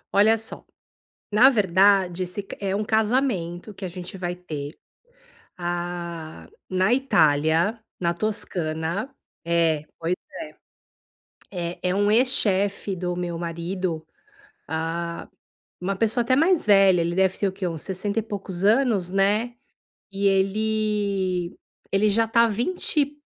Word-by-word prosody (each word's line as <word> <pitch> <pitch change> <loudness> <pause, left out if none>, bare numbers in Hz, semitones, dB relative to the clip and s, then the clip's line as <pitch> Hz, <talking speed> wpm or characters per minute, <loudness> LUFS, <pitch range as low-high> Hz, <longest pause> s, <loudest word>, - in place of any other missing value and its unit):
Olha 215 +3 +5
só, 225 +1 -5 0.7
na 240 +6 +7
verdade, 190 -4 +3
esse 185 +3 -4
é 195 -1 -1
um 210 - -1
casamento 215 -5 0
que 195 - -8
a - - -2
gente 180 +1 -8
vai 180 -1 -4
ter, 150 -4 -7 0.8
hã, 175 - -5 0.2
na 185 +4 +2
Itália, 165 - +3 0.2
na 170 -1 +1
Toscana 175 - -2 0.3
É, 165 -3 +1 0.2
pois 170 +2 0 1.4
é. 175 -3 -3
É 180 - 0
é 180 - 0
um 205 +1 +2
ex-chefe 205 -5 +2
do 180 0 -3
meu 175 -1 -3
marido, 170 0 -3 0.6
hã, 165 +1 -3 0.5
uma 195 +2 -1
pessoa 225 +4 +1
até 255 +2 +2
mais 325 - +3
velha, 195 -3 +6
ele 170 +1 -1
deve 190 0 +2
ter 200 - +2
o - - -1
quê? 190 -1 -3
Uns 165 -3 -4
sessenta 200 +3 -2
e - - -3
poucos 195 -4 -6
anos, 215 -5 +3
né, 210 +5 +1 0.6
e 200 0 0
ele 195 -2 0 0.3
ele 205 +2 +3
já 225 +3 +3
tá 230 +1 +4
há - - +2
20 290 - -1
190 Hz, 135 wpm, -24 LUFS, 175-215 Hz, 1.4 s, na